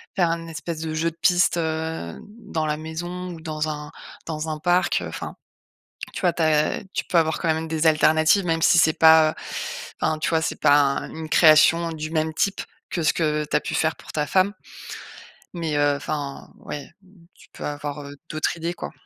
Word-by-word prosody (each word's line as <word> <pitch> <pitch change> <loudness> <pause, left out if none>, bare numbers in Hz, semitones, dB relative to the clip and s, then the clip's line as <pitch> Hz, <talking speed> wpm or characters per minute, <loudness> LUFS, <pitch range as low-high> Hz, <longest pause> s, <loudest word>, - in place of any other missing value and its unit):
faire 175 -3 +2
un 165 0 -3
espèce 160 0 -6
de 160 -1 -3
jeu 165 +1 0
de 165 - -24
piste, 180 0 +3
heu, 160 - -3 0.2
dans 160 -8 -3
la 150 -1 0
maison 175 +3 -6
ou 170 -2 -8
dans 155 -1 -3
un 150 -1 -5 0.4
dans 155 0 -4
un 155 - -3
parc. 175 +3 +2
Enfin, - - -7 0.8
tu - - -4
vois? 180 -2 +3
Tu 165 - -2
as 155 -1 +2
tu - - -1
peux 175 - +1
avoir 160 0 +1
quand 165 - +1
même 160 0 -3
des 160 0 0
alternatives, 160 +4 +4
même 165 -1 0
si 175 - +5
c'est 160 -1 +3
pas 160 -1 +7
heu, - - -15 0.7
enfin, 155 -1 0
tu - - -1
vois? 160 -1 +2
C'est - - -3
pas 145 -1 +6
un 140 -1 +1
une 160 0 -7
création 165 +1 +5
du 155 -1 -5
même 160 -1 0
type 200 +4 0 0.3
que 170 - -2
ce 155 - +3
que 150 -2 0
tu - - -3
as - - +2
pu - - -5
faire 160 -2 +1
pour - - -12
ta 150 -1 -1
femme 190 +5 +2 1.0
mais, 165 -4 -2
heu, 145 0 +3
enfin, 140 -1 -5
ouais, 145 +2 -8 0.4
tu - - -20
peux - - -9
avoir 145 0 -5 0.3
d'autre 155 +2 -1
idée 170 +2 -3
quoi. - - -6
160 Hz, 205 wpm, -23 LUFS, 155-165 Hz, 1.0 s, pas